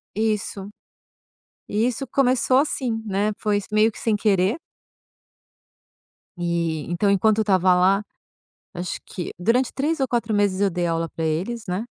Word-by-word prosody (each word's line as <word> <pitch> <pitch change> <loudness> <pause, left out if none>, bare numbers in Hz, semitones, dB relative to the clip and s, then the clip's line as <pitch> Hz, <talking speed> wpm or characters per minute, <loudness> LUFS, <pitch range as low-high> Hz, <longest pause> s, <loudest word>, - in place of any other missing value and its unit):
Isso. 210 -2 -2 1.0
E 220 +4 +1
isso 255 +2 -3
começou 255 -1 +2
assim, 250 -6 -1
né, 205 +1 0
foi 210 -1 +1
s 205 - -5
meio 215 +1 +4
que - - -14
sem 220 -2 0
querer. 200 - +2 1.8
E 170 -3 -1
então 200 +4 +1
enquanto 210 +2 +3
eu - - +4
estava 185 -2 +3
lá, 190 +3 +3 0.7
acho 175 +1 -4
que 180 - -6
durante 235 +8 +1
3 295 +3 -1
ou 265 - +1
4 230 -3 -1
meses 200 -2 +1
eu 200 - +3
dei 175 0 -1
aula 165 0 -1
pra 165 - -5
eles, 190 +9 -2
né. 185 +5 -2
205 Hz, 155 wpm, -23 LUFS, 180-230 Hz, 1.8 s, meio